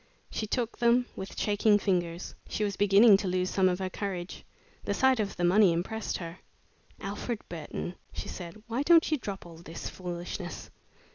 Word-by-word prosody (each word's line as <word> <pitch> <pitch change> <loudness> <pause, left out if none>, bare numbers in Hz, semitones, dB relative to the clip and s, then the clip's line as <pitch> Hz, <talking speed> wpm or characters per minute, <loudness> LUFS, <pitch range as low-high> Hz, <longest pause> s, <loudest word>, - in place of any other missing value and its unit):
She 215 - -3
took 240 +1 -2
them 240 +1 +4
with 190 +1 -6
shaking 205 0 +4
fingers. 175 -4 -1 0.2
She 215 - -1
was 200 -2 -1
beginning 205 +1 +7
to 195 - -3
lose 180 0 0
some 190 -1 +4
of 180 - 0
her 190 0 -2
courage. 185 -3 -4 0.4
The - - -1
sight 265 -2 +4
of 205 -2 -1
the 175 - -3
money 190 +2 +6
impressed 195 +7 -2
her. 170 -1 -7 0.6
"Alfred 205 +3 -4
Burton," 170 +1 -5 0.2
she - - -6
said, 180 +4 -8
"why 235 +3 -1
don't 330 +2 +5
you 305 - +2
drop 200 -5 -6
all 170 -1 -11
this 165 0 -7
foolishness? 175 -1 -6
195 Hz, 180 wpm, -29 LUFS, 175-220 Hz, 0.6 s, beginning